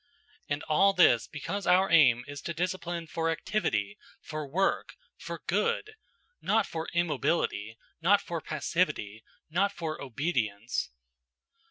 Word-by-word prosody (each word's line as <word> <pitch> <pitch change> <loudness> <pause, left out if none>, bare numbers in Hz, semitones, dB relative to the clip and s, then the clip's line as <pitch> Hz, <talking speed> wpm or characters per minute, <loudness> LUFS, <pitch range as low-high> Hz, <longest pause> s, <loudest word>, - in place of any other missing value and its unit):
And 145 0 -1
all 195 +6 +4
this 145 -11 +5
because 195 +7 -4
our 190 +1 +4
aim 130 -8 +6
is 145 0 -7
to 170 - -5
discipline 175 -1 -2
for 165 0 -1
activity, 110 - -1 0.2
for 155 -2 -6
work, 185 +8 0 0.2
for - - -7
good; 465 -2 0 0.5
not - - +2
for 160 0 -5
immobility, 150 -9 0 0.2
not 195 +5 +5
for 170 -4 -5
passivity, 150 - -1 0.3
not 195 +5 +2
for 160 -5 -5
obedience. 120 - -2
160 Hz, 125 wpm, -29 LUFS, 135-180 Hz, 0.5 s, aim